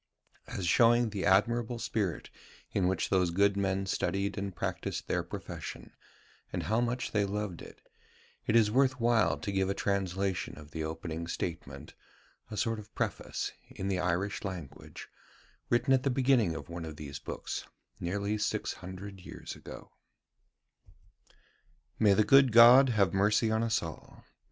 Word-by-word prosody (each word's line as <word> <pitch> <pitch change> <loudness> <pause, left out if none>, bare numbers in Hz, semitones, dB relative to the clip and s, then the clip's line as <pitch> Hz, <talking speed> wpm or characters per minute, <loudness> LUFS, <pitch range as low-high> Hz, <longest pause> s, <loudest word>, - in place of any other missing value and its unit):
As 95 - -4
showing 115 +5 +4
the 100 -2 -3
admirable 115 +4 +2
spirit 105 -6 -2 0.4
in 95 -3 +1
which 95 - -1
those 90 -2 +3
good 100 +3 +3
men 95 -1 0
studied 100 +1 -1
and 100 -2 -4
practised - - -3
their - - 0
profession, - - -7 0.6
and - - -3
how 110 +3 +1
much 120 +1 -2
they 105 -2 +2
loved 100 -3 -3
it, - - -13 0.6
it 110 - +2
is 110 -2 +5
worth 130 +1 +2
while 115 -1 +3
to 100 - -4
give 95 -1 0
a 100 - -1
translation 95 -5 -1
of 75 0 -12
the 80 - -4
opening 80 +1 -5
statement, 85 -1 -5 0.6
a 105 - -6
sort 115 -1 0
of 105 - -13
preface, - - -3 0.2
in 95 - -5
the 95 -2 0
Irish 90 +3 -1
language, 85 -8 -7 0.6
written 120 +3 +3
at 130 - +4
the 140 - 0
beginning 125 -9 +2
of - - -7
one 85 0 -6
of 80 -2 -7
these 70 -2 -7
books, - - -5 0.3
nearly 100 +4 -2
six - - -1
hundred 95 +2 -9
years 90 - -9
ago: - - -11 2.1
"May 105 -3 +5
the 110 - +4
good 135 +3 +6
God 120 +4 +9
have 100 -7 +2
mercy 105 +3 +3
on 110 0 +1
us 115 -3 +1
all. 80 -2 -9
100 Hz, 155 wpm, -30 LUFS, 90-115 Hz, 2.1 s, God